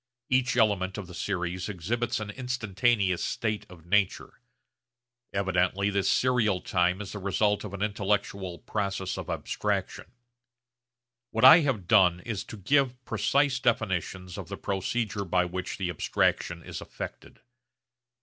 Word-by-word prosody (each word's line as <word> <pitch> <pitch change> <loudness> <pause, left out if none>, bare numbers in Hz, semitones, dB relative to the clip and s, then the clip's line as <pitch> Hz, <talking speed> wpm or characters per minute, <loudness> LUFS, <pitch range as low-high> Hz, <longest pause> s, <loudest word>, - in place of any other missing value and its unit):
Each 125 -1 +2
element 100 -4 +2
of 105 - -5
the 90 - -12
series 90 +1 -3
exhibits 110 +7 -2
an 105 -1 -5
instantaneous 110 -5 0
state 110 -2 -2
of 85 -3 -14
nature. 100 +1 0 0.9
Evidently 95 +1 +1
this 100 -1 +1
serial 115 -7 +2
time 90 +1 +1
is 100 - -7
the 105 - -6
result 105 +2 +1
of 105 - -6
an 100 - -3
intellectual 100 -3 -1
process 100 -2 -3
of - - -6
abstraction. - - -2 1.2
What 115 - +2
I 165 - +11
have 130 - -1
done 90 -4 +5
is 110 -2 -4
to 110 - -9
give 130 +4 +1
precise 140 -1 +1
definitions 95 -6 -1
of - - -7
the - - -5
procedure 100 +2 -2
by 90 -1 +1
which 90 +1 -4
the 90 -3 -2
abstraction 85 +1 0
is - - -7
effected. - - -9
100 Hz, 140 wpm, -28 LUFS, 90-110 Hz, 1.2 s, I